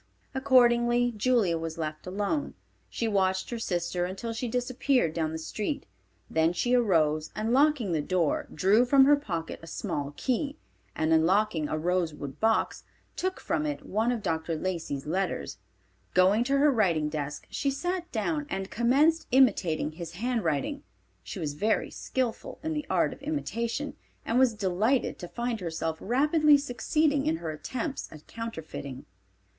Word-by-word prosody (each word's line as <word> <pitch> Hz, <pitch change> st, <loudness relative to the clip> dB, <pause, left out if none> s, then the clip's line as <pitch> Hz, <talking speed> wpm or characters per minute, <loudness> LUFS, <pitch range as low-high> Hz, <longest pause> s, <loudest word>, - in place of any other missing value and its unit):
Accordingly 240 Hz, -2 st, +4 dB
Julia 210 Hz, -7 st, +2 dB
was 165 Hz, 0 st, -5 dB
left 155 Hz, 0 st, -5 dB
alone. 205 Hz, +10 st, -2 dB, 0.3 s
She 230 Hz, -, -2 dB
watched 190 Hz, -2 st, +1 dB
her 235 Hz, -, -3 dB
sister 175 Hz, -3 st, -1 dB
until 195 Hz, +6 st, -4 dB
she 235 Hz, +2 st, -3 dB
disappeared 250 Hz, -, +1 dB
down 160 Hz, -2 st, -1 dB
the 160 Hz, -, -3 dB
street. 210 Hz, -, -4 dB, 0.4 s
Then 160 Hz, +1 st, +2 dB
she 240 Hz, +8 st, 0 dB
arose, 160 Hz, -10 st, +2 dB
and 220 Hz, +2 st, -1 dB
locking 275 Hz, -7 st, +3 dB
the 160 Hz, -3 st, +1 dB
door, 170 Hz, 0 st, 0 dB
drew 200 Hz, +8 st, +4 dB
from 270 Hz, +2 st, +6 dB
her 290 Hz, +1 st, +7 dB
pocket 170 Hz, -, -4 dB
a 165 Hz, -, -11 dB
small 145 Hz, -2 st, -4 dB
key, 280 Hz, +3 st, -1 dB, 0.4 s
and 160 Hz, 0 st, +1 dB
unlocking 165 Hz, 0 st, +2 dB
a 155 Hz, -, -1 dB
rosewood 160 Hz, -5 st, -2 dB
box, 225 Hz, 0 st, +1 dB, 0.3 s
took 375 Hz, 0 st, -2 dB
from 150 Hz, -, -1 dB
it 145 Hz, -1 st, -4 dB
one 220 Hz, +5 st, +1 dB
of 235 Hz, -4 st, -3 dB
Dr. 165 Hz, -2 st, -1 dB
Lacey's 160 Hz, -5 st, -3 dB
letters. 185 Hz, +5 st, -2 dB, 0.6 s
Going 190 Hz, +5 st, +5 dB
to 275 Hz, +2 st, +2 dB
her 290 Hz, +1 st, +5 dB
writing 175 Hz, -, +2 dB
desk, 150 Hz, -1 st, -4 dB
she 280 Hz, -, 0 dB
sat 355 Hz, +5 st, -3 dB
down 290 Hz, +7 st, -1 dB
and 195 Hz, -7 st, -4 dB
commenced 285 Hz, +8 st, +3 dB
imitating 195 Hz, -, +3 dB
his 165 Hz, +1 st, -8 dB
handwriting. 225 Hz, -, -1 dB, 0.4 s
She -, -, -8 dB
was 155 Hz, -5 st, -3 dB
very 215 Hz, +9 st, 0 dB
skillful 250 Hz, -4 st, -3 dB
in 320 Hz, 0 st, -1 dB
the 300 Hz, -2 st, -3 dB
art -, -, +2 dB
of -, -, -15 dB
imitation, 280 Hz, -2 st, -2 dB, 0.3 s
and 235 Hz, +2 st, +2 dB
was 255 Hz, -4 st, +4 dB
delighted 210 Hz, +6 st, +1 dB
to 175 Hz, -, -6 dB
find 235 Hz, +3 st, -3 dB
herself 165 Hz, -2 st, -3 dB
rapidly 295 Hz, -, +4 dB
succeeding 285 Hz, +2 st, 0 dB
in 160 Hz, -, +2 dB
her 165 Hz, -1 st, -4 dB
attempts 260 Hz, -, -4 dB
at 155 Hz, -1 st, -12 dB
counterfeiting. 160 Hz, -, -7 dB
215 Hz, 155 wpm, -28 LUFS, 165-255 Hz, 0.6 s, her